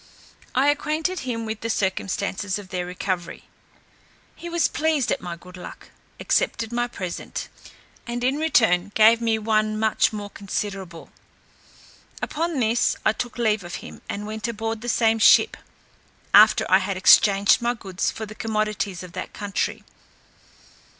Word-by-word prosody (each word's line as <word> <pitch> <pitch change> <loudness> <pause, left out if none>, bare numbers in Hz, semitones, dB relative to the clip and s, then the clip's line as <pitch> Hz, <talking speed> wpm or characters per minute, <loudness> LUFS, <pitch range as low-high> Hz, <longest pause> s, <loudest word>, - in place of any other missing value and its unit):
I 270 +3 +4
acquainted 310 +5 -1
him 230 -3 -4
with 220 -1 -5
the 230 - -3
circumstance 195 -1 -1
of 200 -3 -10
their 180 -1 -3
recovery. 180 -1 -4 0.9
He 345 - -8
was 340 0 +2
pleased 305 -5 0
at - - -1
my 175 -1 -5
good 180 +2 -14
luck, 180 - -11 0.3
accepted 225 0 0
my 240 0 0
present, 185 -7 -6 0.6
and 240 0 -4
in 265 +3 +1
return 210 - +2
gave 225 +2 +6
me 225 -1 +1
one 215 0 0
much 220 0 +2
more 205 -1 -6
considerable. 195 -3 -5 1.1
Upon 330 -1 -2
this, 230 0 +2
I - - +4
took 245 +2 -5
leave 215 -4 +1
of 175 0 -7
him, - - -11
and 205 +1 -4
went 215 +1 -4
aboard 225 -1 -4
the 240 - -4
same 225 -1 +2
ship, - - +6 0.8
after - - +7
I - - +5
had - - -3
exchanged 200 +1 +5
my 240 +1 0
goods 190 -5 -3
for 220 - -6
the 215 - -10
commodities 215 -4 -2
of 180 - -10
that - - -7
country. 205 -2 -3
220 Hz, 150 wpm, -23 LUFS, 195-240 Hz, 1.1 s, after